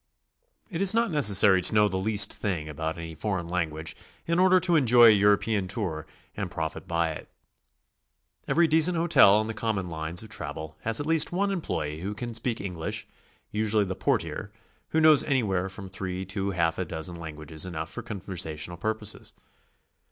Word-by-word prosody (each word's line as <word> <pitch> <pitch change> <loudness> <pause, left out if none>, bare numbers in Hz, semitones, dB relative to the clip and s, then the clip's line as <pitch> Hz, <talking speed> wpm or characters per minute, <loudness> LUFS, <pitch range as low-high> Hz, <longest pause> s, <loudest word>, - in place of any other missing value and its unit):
It 170 0 -3
is 195 +2 +5
not 230 -3 +1
necessary 105 - +5
to 100 - +4
know 105 0 +5
the 95 -2 -3
least 105 +2 +2
thing 90 -7 -3
about 80 +2 -4
any 80 -1 -7
for 95 +5 -3
eign 85 0 -8
language 80 -3 -3 0.3
in 170 +1 0
order 185 0 +5
to 175 -1 +1
enjoy 120 -5 +6
a - - +9
European 105 0 +2
tour 90 -6 -4 0.3
and - - -4
profit 80 -1 -5
by 85 -1 0
it. 75 - -9 1.2
Every 165 +5 +3
decent 160 +3 +3
hotel 165 -12 +5
on 110 +1 +1
the 115 - -4
comni'On 105 -4 -3
lines 80 +4 -1
of 110 - -12
travel 80 -6 -6
has 115 0 +2
at 145 - -3
least 160 -1 +2
one 200 +3 0
employee 75 - -3
who 100 +3 -4
can 120 +2 -6
speak 115 +1 -2
English, 90 -5 -4 0.5
usually 105 -1 +1
the 95 - -4
portier, - - -2 0.4
who 160 - +1
knows 155 -2 +6
anywhere 100 -9 0
from 95 0 -9
three 95 0 -5
to 95 +1 -3
half 85 -3 -1
a 95 - -1
dozen 80 +2 -3
languages 80 -2 -5
enough 80 -3 -5
for - - -6
conversational 85 -5 -4
purposes. 110 +2 -2
100 Hz, 180 wpm, -26 LUFS, 85-115 Hz, 1.2 s, a